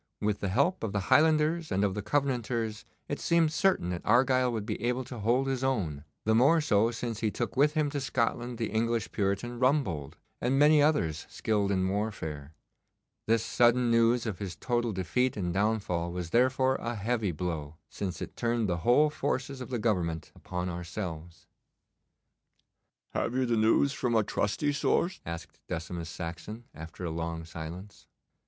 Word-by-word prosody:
With 105 -1 0
the 100 - -2
help 140 - +2
of 110 - -2
the 100 -3 +1
Highlanders 155 +1 +3
and 95 +2 +1
of 100 -2 +1
the 105 - -3
Covenanters 120 -3 -1 0.2
it - - -3
seemed 165 -2 +2
certain 180 - +2
that 85 - -3
Argyle 130 0 +3
would 110 -3 -3
be 105 -2 -4
able 125 +2 0
to 125 -1 -8
hold 120 +6 +2
his 135 -1 -1
own, 85 - -1 0.2
the 110 - +3
more 140 +9 +5
so 115 -7 +3
since 115 -2 -4
he 110 - +1
took 120 +3 -3
with 150 +3 +3
him 150 -2 +1
to 145 -1 -2
Scotland 120 -1 -1
the 110 -3 -2
English 115 +1 0
Puritan 105 +4 -1
Rumbold, 125 - +1 0.3
and 130 +3 +1
many 150 +1 +6
others 85 - +1
skilled 105 -2 0
in 95 -1 +1
warfare. 85 -8 -3 0.8
This 115 0 +2
sudden 120 0 +3
news 115 +1 +3
of 105 -5 -3
his 95 -4 -5
total 120 +4 -1
defeat 105 +7 0
and 90 -3 -2
downfall 95 -4 0
was 90 -2 -5
therefore 130 +2 +3
a 120 0 -4
heavy 110 -1 -1
blow, 80 -3 -4
since 95 -2 -4
it - - -9
turned 115 -2 0
the 85 -2 0
whole 125 - +4
forces 135 -3 -2
of 125 - -7
the 125 - -1
Government 90 -8 -1
upon 90 0 -4
ourselves. 85 -1 -6 1.7
'Have 120 - -1
you 130 0 +2
the 120 -1 +1
news 115 +6 +3
from 125 -5 -1
a 110 - +4
trusty 105 +9 0
source?' 170 +5 0
asked 85 0 -7
Decimus 80 0 -4
Saxon, 85 +7 -6
after 80 +3 -8
a 85 - -2
long 80 0 -4
silence. 85 +5 -9
110 Hz, 175 wpm, -29 LUFS, 90-125 Hz, 1.7 s, many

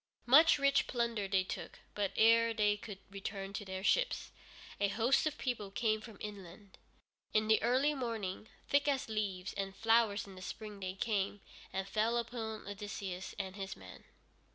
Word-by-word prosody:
Much 305 +7 +7
rich 280 -1 +3
plunder 235 -4 -1
they 190 -1 +2
took, 185 - -6 0.2
but 200 -2 -1
ere 230 +1 +5
they 210 -1 +3
could 205 -1 -8
return 195 0 -5
to 205 - -4
their 190 -1 -5
ships, - - +1 0.5
a 205 - +3
host 240 +8 +2
of 305 - -3
people 240 -6 -2
came 215 +1 0
from 215 -2 -11
inland. 200 -1 -9 0.6
In 215 0 +3
the 220 0 +5
early 260 +5 +3
morning, 225 -7 -3 0.2
thick 285 +1 +3
as 275 -5 0
leaves 205 -3 -2
and 195 -1 -4
flowers 225 -1 +3
in 195 - -11
the 185 - -11
spring 210 +1 -7
they 185 -1 -4
came, 205 -1 -1 0.3
and 190 +1 -3
fell 220 +4 +1
upon 225 -3 -4
Odysseus 200 -2 -5
and 190 0 -4
his 195 -1 -5
men. - - -12
210 Hz, 170 wpm, -34 LUFS, 195-235 Hz, 0.6 s, Much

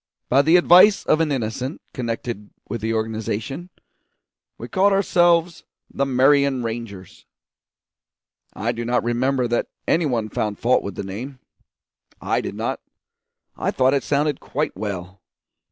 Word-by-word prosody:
By 135 +2 +5
the 160 +4 +4
advice 180 +4 +6
of 155 - +3
an 155 -2 +1
innocent 125 +3 -3
connected 115 -3 -4 0.2
with 115 - -5
the 110 +1 -1
organisation, 110 - -3 0.9
we - - -7
called 195 +1 +3
ourselves 175 -3 +2 0.3
the 140 - 0
Marion 135 0 +3
Rangers. 110 -5 -7 1.3
I 115 +3 -1
do 120 0 -5
not 120 +1 0
remember 125 +2 0
that 120 - 0 0.2
any 160 -1 +2
one 115 -5 -1
found 105 -1 -2
fault 125 +2 +2
with 100 -2 -6
the - - -4
name. 115 +8 -7 0.8
I - - 0
did - - -6
not; - - -3 0.8
I - - -2
thought 130 +1 +2
it 140 - +2
sounded 145 0 0
quite - - -3
well. 95 -1 -6
125 Hz, 140 wpm, -22 LUFS, 110-145 Hz, 1.3 s, advice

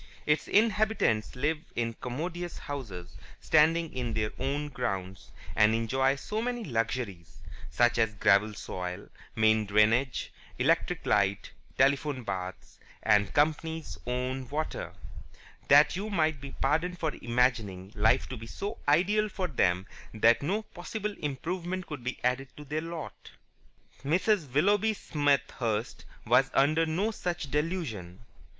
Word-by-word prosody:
Its 150 +1 +1
inhabitants 210 - +2
live 150 +4 0 0.2
in 115 -1 -1
commodious 170 +9 -5
houses, 100 -12 -7 0.2
standing 160 +1 +3
in 120 -3 -3
their 110 -1 0
own 140 +3 -1
grounds, 100 -8 -4 0.2
and 105 +1 +5
enjoy 130 +4 +1
so 210 +10 -3
many 240 0 -2
luxuries 115 - -3 0.3
such 120 0 +2
as 110 -2 +2
gravel 100 +2 +4
soil, 90 -2 -6 0.3
main 110 0 +4
drainage, 105 +6 +2 0.2
electric - - +1
light, 100 -1 +1 0.3
telephone, 140 0 +2
baths 95 -3 -6
(h. - - -27 0.2
and 105 -2 +4
c.), - - -12
and - - -13
company's 160 +2 0
own 125 +1 -2
water, 155 +2 -3 0.8
that 145 +3 +6
you 205 +4 -3
might 160 -7 +1
be 140 - -7
pardoned 165 +6 0
for 160 -3 -1
imagining 115 -6 0
life 110 +5 +3
to 130 - -6
be 115 -1 -9
so 205 - -5
ideal 200 +8 +3
for 190 -2 -2
them 90 - +1 0.3
that 115 +2 +5
no 195 +9 -1
possible 210 +2 -5
improvement 175 +6 -3
could 145 -5 -7
be 125 +1 -3
added 125 +2 +1
to 150 - -9
their 150 +3 -2
lot. 165 -2 -7 0.7
Mrs. 170 - +1
Willoughby 205 - +3
Smethurst 140 - -1 0.2
was - - +4
under 155 +4 +3
no 190 +8 0
such 175 -8 -4
delusion. 130 - -3
135 Hz, 135 wpm, -29 LUFS, 115-165 Hz, 0.8 s, that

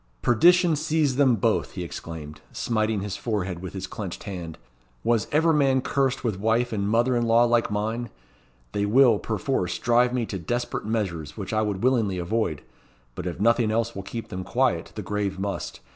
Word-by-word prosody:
"Perdition 175 +7 +5
seize 155 -3 +1
them 135 -4 +5
both!" 100 - 0
he - - -4
exclaimed, 75 -2 -8
smiting 110 -2 -1
his 100 -1 -4
forehead 95 -6 -2
with 95 +1 -7
his 95 -1 -4
clenched 95 -2 -6
hand. 85 -5 -6 0.5
"Was 115 -3 +1
ever 160 +2 +3
man 135 -3 +3
cursed 135 -1 0
with 110 -6 -1
wife 115 +3 +1
and 100 -1 -1
mother 120 +3 +2
in 120 -1 +1
law 115 +1 +5
like 120 -1 +2
mine! 110 +3 -2 0.6
They 100 +6 0
will, 120 -1 +5
perforce, 110 -4 -1
drive 120 +1 +3
me 125 -2 -1
to 95 -3 -5
desperate 120 +9 -3
measures, 95 -9 -3
which 100 0 -5
I 110 - +2
would 105 -2 -2
willingly 115 -7 +2
avoid; 85 -4 -1 0.5
but 85 - -5
if 85 - -5
nothing 115 +1 +3
else 115 +1 0
will 100 - -4
keep 115 +4 -7
them 90 0 -5
quiet, - - 0
the - - -5
grave 100 -2 -2
must. 100 +1 -4
110 Hz, 185 wpm, -25 LUFS, 95-120 Hz, 0.6 s, Perdition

